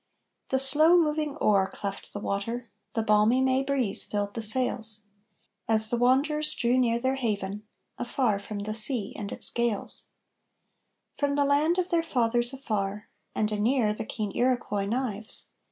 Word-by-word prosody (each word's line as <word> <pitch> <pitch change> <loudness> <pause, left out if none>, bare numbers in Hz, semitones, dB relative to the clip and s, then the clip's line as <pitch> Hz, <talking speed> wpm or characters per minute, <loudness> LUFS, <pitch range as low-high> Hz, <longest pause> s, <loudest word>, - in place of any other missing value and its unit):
The 265 - +1
slow 300 +6 +5
moving 300 -3 0
oar 200 -8 +2
cleft 200 -1 -7
the 205 - -6
water, 230 +4 -4 0.2
the 225 - 0
balmy 215 +3 +3
May 260 0 +1
breeze 270 -7 +1
filled 205 -1 -3
the 230 - -5
sails, 220 -1 +1 0.7
As 220 -1 +8
the 240 - 0
wanderers 285 +5 +2
drew 245 0 +1
near 235 -2 +1
their 260 +2 -1
haven, 210 -4 -4 0.3
afar 240 -4 -1
from 205 0 -7
the 215 +1 -4
sea 220 -1 +3
and 205 -1 -6
its - - +1
gales; 235 -4 -2 1.1
From 285 -1 -2
the 285 0 +2
land 300 +5 +1
of 365 0 -2
their 340 -1 +2
fathers 240 -5 0
afar, 210 -6 -4 0.3
and 215 0 -1
anear 215 +1 0
the - - -6
keen 215 -2 -5
Iroquois 240 -5 -1
knives. 220 -2 -3
235 Hz, 155 wpm, -26 LUFS, 210-265 Hz, 1.1 s, As